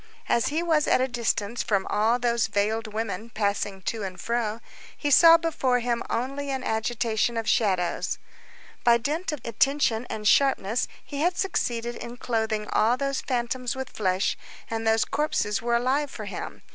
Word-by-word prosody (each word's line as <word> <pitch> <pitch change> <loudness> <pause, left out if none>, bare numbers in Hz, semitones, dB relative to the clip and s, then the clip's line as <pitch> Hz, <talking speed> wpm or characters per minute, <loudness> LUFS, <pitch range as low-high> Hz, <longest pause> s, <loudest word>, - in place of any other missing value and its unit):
As 235 - +2
he 315 +4 0
was 320 -3 +2
at - - +4
a 260 - +2
distance 235 -2 -1
from 200 -3 0
all 220 +3 +2
those 235 -2 +1
veiled 215 +1 0
women 220 0 -4
passing 200 -3 -2
to 225 +3 -2
and 185 -2 -5
fro, 230 +1 -1 0.4
he 290 - -1
saw 330 +4 +9
before 305 -6 0
him 240 -1 -1
only 275 +4 -2
an 265 -1 -2
agitation 225 0 0
of 225 -1 -2
shadows. 185 -6 +1 0.7
By 235 -1 +6
dint 300 +10 -2
of 300 - -5
attention 245 0 +1
and 210 -1 -3
sharpness 250 -3 +3 0.2
he 285 -1 -5
had 350 +2 +1
succeeded 240 -10 -1
in 240 +1 -8
clothing 220 -3 -1
all 230 +3 +3
those 275 0 -1
phantoms 250 0 -2
with 265 -1 -5
flesh, 190 -2 0 0.4
and 225 0 -2
those 220 0 +3
corpses 225 -9 0
were 235 0 +1
alive 265 +5 +1
for - - -7
him. - - -7
235 Hz, 170 wpm, -26 LUFS, 220-265 Hz, 0.7 s, saw